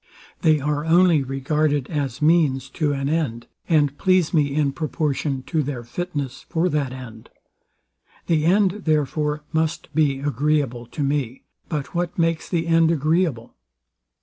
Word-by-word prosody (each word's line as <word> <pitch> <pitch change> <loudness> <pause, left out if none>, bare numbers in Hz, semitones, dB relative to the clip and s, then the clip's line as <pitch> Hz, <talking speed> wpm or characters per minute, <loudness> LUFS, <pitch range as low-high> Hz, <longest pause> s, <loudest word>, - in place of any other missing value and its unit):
They 155 -4 +4
are 145 +1 -1
only 170 -1 +4
regarded 140 +1 0
as 140 -3 -2
means 145 -5 +2
to 150 -3 0
an 135 -1 -2
end, 140 -7 -1 0.2
and 145 -4 +3
please 185 -3 +2
me 145 -3 +2
in 145 -2 +2
proportion 145 -3 -2
to 155 +4 -1
their 135 -4 -4
fitness 140 -1 -5
for 170 +2 +1
that 145 -5 -1
end. 120 -4 -10 1.0
The 155 -2 +1
end, 195 +2 +2
therefore, 150 0 0
must 160 -1 -1
be 145 -3 +2
agreeable 140 -3 0
to 145 - -4
me. 135 -3 -2 0.3
But 150 -4 -4
what 175 0 -2
makes 165 -1 0
the 170 -2 0
end 165 -1 +4
agreeable? 155 -5 0
150 Hz, 145 wpm, -22 LUFS, 135-165 Hz, 1.0 s, They